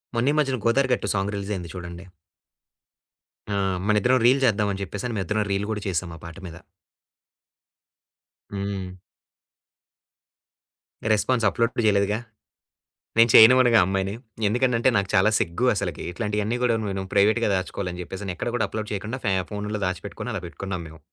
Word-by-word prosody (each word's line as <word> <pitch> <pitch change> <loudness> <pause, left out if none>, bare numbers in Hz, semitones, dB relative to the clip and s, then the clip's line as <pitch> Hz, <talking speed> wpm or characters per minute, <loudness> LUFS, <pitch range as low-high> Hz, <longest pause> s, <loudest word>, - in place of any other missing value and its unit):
మొన్న 125 +5 +2
ఈ - - 0
మధ్యన 135 -4 +1
'గోదారి 130 +3 +3
గట్టు' 100 - -1
సాంగ్ 100 0 -1
రిలీజయింది 100 -4 -4
చూడండి. 85 0 -8 1.5
ఆ! 100 - 0 0.3
మన 105 - +3
ఇద్దరం 125 +4 +3
రీల్ 130 +3 +5
చేద్దాం 105 -3 +2
అని 100 - -6
చెప్పేసని 105 +6 -5
మేము 95 - -1
ఇద్దరం 105 +4 0
రీల్ 100 +1 -1
కూడా 105 -1 -3
చేసాం 90 -1 -2
ఆ - - -16
పాట 85 +2 -9
మీద. 80 - -10 2.0
హ్మ్. 100 -2 -4 2.2
రెస్పాన్స్ 115 +2 +1
అప్పుడప్పులు 115 +2 0
చేయలేదుగా. 105 +1 +2 1.0
నేను 115 +1 +6
చేయనివనుగా 120 0 +8
ఆ - - +4
అమ్మాయిని. 95 +1 -1 0.3
ఎందుకనంటే 120 +2 +2
నాకు 100 -1 -1
చాలా 95 +3 +5
సిగ్గు 85 +9 -1
అసలకి. 90 -8 -3
ఇట్లాంటియన్నీ 105 +4 -2
గూడా 120 -2 +2
నేను 95 0 -3
ప్రైవేట్‌గా 105 +3 +3
దాచుకోవాలి 95 0 -3
అని 90 - -6
చెప్పేసని 95 +1 -6
ఎక్కడ 120 - -3
కూడా 110 -3 0
అప్లోడ్ 110 0 -5
చేయకుండా 110 +6 -4
ఫ్యా 95 -2 +1
ఫోనూలో 105 0 -4
దాచిపెట్టుకొని 95 -1 -5
అలా - - -3
పెట్టుకున్నాం 90 0 -5
మేము. 80 0 -14
105 Hz, 150 wpm, -24 LUFS, 95-115 Hz, 2.2 s, చేయనివనుగా